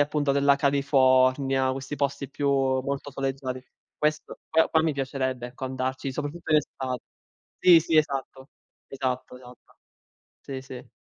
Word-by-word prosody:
appunto 145 Hz, -1 st, +1 dB
della 140 Hz, 0 st, +4 dB
California, 135 Hz, -1 st, +3 dB
questi 135 Hz, +2 st, -5 dB
posti 140 Hz, -1 st, -2 dB
più 140 Hz, 0 st, -1 dB
molto 135 Hz, +1 st, 0 dB
soleggiati. 135 Hz, -1 st, -4 dB, 0.4 s
Questo 150 Hz, 0 st, -1 dB
qua 160 Hz, 0 st, +3 dB
qua 160 Hz, -, +3 dB
mi 160 Hz, -1 st, +1 dB
piacerebbe 130 Hz, -2 st, -2 dB
ecco 125 Hz, +1 st, -8 dB
andarci 130 Hz, +1 st, -3 dB
soprattutto 150 Hz, +4 st, -5 dB
in 155 Hz, -, +7 dB
estate. 130 Hz, -4 st, -5 dB, 0.6 s
Sì, 175 Hz, -2 st, +7 dB
sì, 160 Hz, 0 st, 0 dB
esatto, 135 Hz, -2 st, -1 dB, 0.4 s
esatto, 130 Hz, -2 st, -3 dB
esatto. 125 Hz, 0 st, -16 dB, 0.6 s
Sì, 135 Hz, -1 st, -7 dB
sì. 130 Hz, -1 st, -10 dB
135 Hz, 135 wpm, -26 LUFS, 130-145 Hz, 0.6 s, in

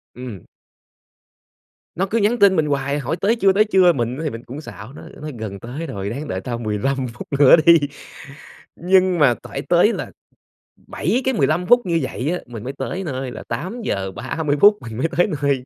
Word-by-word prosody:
Ừm. 125 Hz, -7 st, -8 dB, 1.5 s
Nó 185 Hz, -, 0 dB
cứ 210 Hz, +4 st, -1 dB
nhắn 230 Hz, +3 st, +1 dB
tin 200 Hz, -2 st, +6 dB
mình 160 Hz, -3 st, +2 dB
hoài 140 Hz, 0 st, -1 dB
hỏi: 140 Hz, +5 st, -2 dB
"Tới 215 Hz, +4 st, +3 dB
chưa, 195 Hz, -4 st, +3 dB
tới 210 Hz, -, +4 dB
chưa?" 185 Hz, -4 st, +4 dB
Mình 120 Hz, 0 st, -2 dB
á 160 Hz, -, -5 dB
thì 155 Hz, -, -1 dB
mình 115 Hz, -1 st, -8 dB
cũng 140 Hz, +5 st, -8 dB
xạo 125 Hz, -4 st, -10 dB
nó, -, -, -11 dB, 0.2 s
nói: 150 Hz, 0 st, -5 dB
"Gần 100 Hz, -3 st, -6 dB
tới 140 Hz, -, -6 dB
rồi, 100 Hz, 0 st, -5 dB
ráng 140 Hz, +6 st, -5 dB
đợi 95 Hz, -8 st, -3 dB
tao 120 Hz, +3 st, -4 dB
15 120 Hz, +4 st, -2 dB
phút 120 Hz, -, -9 dB
nữa 140 Hz, -3 st, +8 dB
đi." 170 Hz, -1 st, +8 dB, 1.0 s
Nhưng 185 Hz, 0 st, +2 dB
mà 135 Hz, -5 st, +5 dB
tải -, -, -6 dB
tới -, -, +3 dB
là -, -, -5 dB, 0.8 s
7 220 Hz, -, -1 dB
cái 265 Hz, -, +1 dB
15 155 Hz, -, +1 dB
phút 245 Hz, 0 st, +5 dB
như 170 Hz, -2 st, +1 dB
vậy 130 Hz, +4 st, -3 dB
á, 180 Hz, -, -2 dB
mình 115 Hz, -3 st, -9 dB
mới 130 Hz, +3 st, -5 dB
tới 190 Hz, +4 st, -4 dB
nơi 130 Hz, -5 st, -4 dB
là -, -, -8 dB
8:30 150 Hz, -, 0 dB
mình 115 Hz, -2 st, -8 dB
mới 140 Hz, +6 st, +1 dB
tới 175 Hz, -, +4 dB
nơi. 140 Hz, -3 st, 0 dB
145 Hz, 200 wpm, -20 LUFS, 125-185 Hz, 1.5 s, nữa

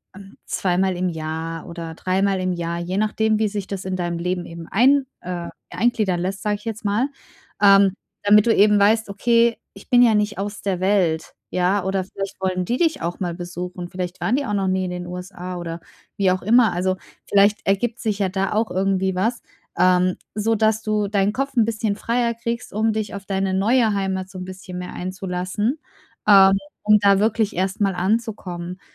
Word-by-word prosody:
hm, 195 Hz, 0 st, -13 dB
zweimal 185 Hz, 0 st, 0 dB
im 180 Hz, +1 st, -1 dB
Jahr 160 Hz, 0 st, -5 dB
oder 170 Hz, -1 st, -7 dB
dreimal 190 Hz, +2 st, 0 dB
im 185 Hz, 0 st, -1 dB
Jahr.”, 170 Hz, 0 st, -3 dB
je 180 Hz, +2 st, -3 dB
nachdem, 215 Hz, +1 st, +1 dB
wie 220 Hz, -, +2 dB
sich 200 Hz, -2 st, -4 dB
das 195 Hz, -2 st, -5 dB
in 190 Hz, 0 st, -2 dB
deinem 175 Hz, -2 st, -2 dB
Leben 180 Hz, 0 st, -2 dB
eben 170 Hz, -1 st, -9 dB
ein 265 Hz, +6 st, +4 dB, 0.2 s
äh, 175 Hz, -1 st, -5 dB, 0.2 s
eingliedern 215 Hz, -7 st, 0 dB
lässt, 190 Hz, +2 st, -3 dB
sage 210 Hz, -1 st, +1 dB
ich 205 Hz, -, -12 dB
jetzt 225 Hz, 0 st, -5 dB
mal. 210 Hz, +6 st, +1 dB, 0.5 s
Ähm, 200 Hz, -1 st, +6 dB, 0.3 s
damit 210 Hz, +1 st, +6 dB
du 230 Hz, -, +4 dB
eben 210 Hz, 0 st, +5 dB
weißt: 220 Hz, +2 st, +3 dB
„Okay, 230 Hz, +3 st, +2 dB, 0.2 s
ich -, -, -15 dB
bin 245 Hz, -1 st, +6 dB
ja 225 Hz, -3 st, +5 dB
nicht 210 Hz, 0 st, 0 dB
aus 205 Hz, +1 st, -4 dB
der 190 Hz, -3 st, -1 dB
Welt.”, 185 Hz, -4 st, +1 dB, 0.2 s
ja, 185 Hz, +2 st, +1 dB
oder 190 Hz, 0 st, 0 dB
vielleicht 195 Hz, +1 st, -6 dB
wollen 185 Hz, -1 st, -1 dB
die 240 Hz, +7 st, -1 dB
dich 325 Hz, -, +1 dB
auch 170 Hz, +1 st, -3 dB
mal 175 Hz, -3 st, -2 dB
besuchen. 180 Hz, 0 st, -6 dB
Vielleicht 180 Hz, 0 st, -5 dB
waren 235 Hz, -, +1 dB
die 285 Hz, -, 0 dB
auch 210 Hz, -, -3 dB
noch 195 Hz, -1 st, 0 dB
nie 185 Hz, 0 st, 0 dB
in -, -, -3 dB
den 180 Hz, 0 st, -5 dB
USA 180 Hz, 0 st, -7 dB
oder 170 Hz, -1 st, -6 dB, 0.4 s
wie 195 Hz, -2 st, +3 dB
auch 185 Hz, 0 st, -1 dB
immer. 230 Hz, +1 st, +4 dB
Also, 185 Hz, +1 st, 0 dB, 0.3 s
vielleicht 205 Hz, +1 st, +4 dB
ergibt 220 Hz, +4 st, 0 dB
sich 215 Hz, -3 st, -1 dB
ja 200 Hz, -2 st, +1 dB
da 195 Hz, +1 st, -1 dB
auch 220 Hz, +1 st, 0 dB
irgendwie 190 Hz, 0 st, +1 dB
was, 225 Hz, +6 st, -1 dB, 0.3 s
ähm, 185 Hz, 0 st, +3 dB, 0.2 s
so 220 Hz, +2 st, +1 dB
dass 220 Hz, 0 st, +2 dB
du 215 Hz, -2 st, 0 dB
deinen 200 Hz, 0 st, +1 dB
Kopf 275 Hz, +3 st, -3 dB
‘n 235 Hz, -, +5 dB
bisschen 220 Hz, -2 st, -1 dB
freier 235 Hz, +2 st, 0 dB
kriegst, 235 Hz, +1 st, -5 dB
um 220 Hz, +2 st, +1 dB
dich 215 Hz, -1 st, -3 dB
auf 200 Hz, 0 st, -7 dB
deine 195 Hz, -1 st, -1 dB
neue 220 Hz, +3 st, +3 dB
Heimat 190 Hz, -1 st, -2 dB
so 185 Hz, -, -8 dB
'n 185 Hz, -, -6 dB
bisschen 185 Hz, -1 st, -8 dB
mehr 180 Hz, -, -7 dB
einzulassen, 185 Hz, -, -3 dB, 0.5 s
ähm, 195 Hz, -2 st, +8 dB, 0.3 s
um 210 Hz, 0 st, +6 dB
da 200 Hz, -1 st, +4 dB
wirklich 220 Hz, 0 st, +1 dB
erstmal 190 Hz, +2 st, 0 dB
anzukommen. 185 Hz, -3 st, -2 dB
195 Hz, 200 wpm, -22 LUFS, 180-215 Hz, 0.5 s, ähm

